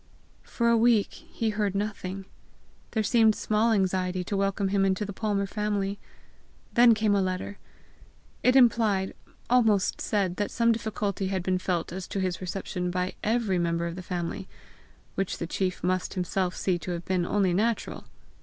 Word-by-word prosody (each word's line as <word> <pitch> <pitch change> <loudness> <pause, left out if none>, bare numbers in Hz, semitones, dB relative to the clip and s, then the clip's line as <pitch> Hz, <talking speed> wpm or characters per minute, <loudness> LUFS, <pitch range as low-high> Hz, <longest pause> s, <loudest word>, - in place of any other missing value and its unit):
For 235 - -1
a 235 - +5
week, 225 -2 +3 0.2
he 225 -1 -1
heard 205 -2 -1
nothing; 195 -2 -3 0.6
there 220 - 0
seemed 220 -1 +4
small 215 +2 +1
anxiety 185 -3 +1
to 200 - -3
welcome 195 0 0
him 195 0 +2
into 195 +2 +1
the 200 - -6
Palmer 200 -1 -1
family! 205 -1 -2 0.7
Then 235 -1 +7
came 215 -1 +2
a 200 - +3
letter. 185 +2 -3 0.8
It 250 +1 +4
implied, 225 -6 +4 0.3
almost 225 -5 +3
said 190 -4 0
that 205 - -1
some 230 0 +2
difficulty 210 -4 -2
had 190 -2 -2
been 185 0 0
felt 175 -2 -2
as 185 0 -5
to 200 - -3
his 185 -1 -2
reception 180 0 -3
by 180 +1 -1
EVERY 215 -4 +1
member 170 0 0
of 170 0 -4
the 185 - -6
family 180 +1 -4 0.7
which 195 -1 -2
the - - -3
chief 185 +2 -2
must 185 -1 -1
himself 185 0 -1
see 180 -2 0
to 170 - -7
have 170 0 -5
been 185 -2 +1
only 190 0 +1
natural! 220 +5 -1
195 Hz, 170 wpm, -27 LUFS, 185-215 Hz, 0.8 s, Then